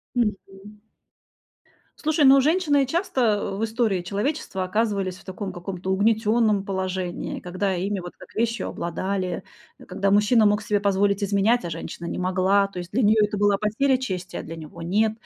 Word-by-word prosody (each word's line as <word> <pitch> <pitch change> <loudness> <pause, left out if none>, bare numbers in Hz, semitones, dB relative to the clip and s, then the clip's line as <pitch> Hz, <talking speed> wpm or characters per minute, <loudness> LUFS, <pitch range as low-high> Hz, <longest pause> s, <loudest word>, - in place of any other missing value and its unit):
Мгм. 210 -2 -3 1.2
Слушай, 310 -1 +1
ну, 270 0 +8
женщины, 300 -1 +3
э, - - -5
часто, 335 0 -1
э, 205 -4 +1
в 210 - -4
истории 225 -4 0
человечества 200 - -2
оказывались 200 -2 -1
в - - -18
таком 190 0 -6
каком-то 185 +1 -5
угнетённом 215 +1 +2
положении, 185 -2 -3
когда 185 +2 -2
ими 195 +2 -2
вот 175 0 -9
как - - -15
вещью 230 -1 -1
обладали. 185 +2 -3 0.4
Э, - - -14
когда 195 0 -1
мужчина 210 +2 +4
мог 205 0 +2
себе 205 0 0
позволить 200 0 +1
изменять, 200 +4 +2
а 170 - -4
женщина 165 +1 -6
не - - -4
могла, 185 +2 +2
то 195 -2 -9
есть 175 0 -7
для 250 +5 +1
неё 215 +1 +4
это 210 0 0
была 205 0 +3
потеря 255 +6 +1
чести, 185 -8 -5
а - - -4
для 165 - -8
него 160 +1 -10
нет. 210 +6 +1
200 Hz, 175 wpm, -24 LUFS, 185-225 Hz, 1.2 s, ну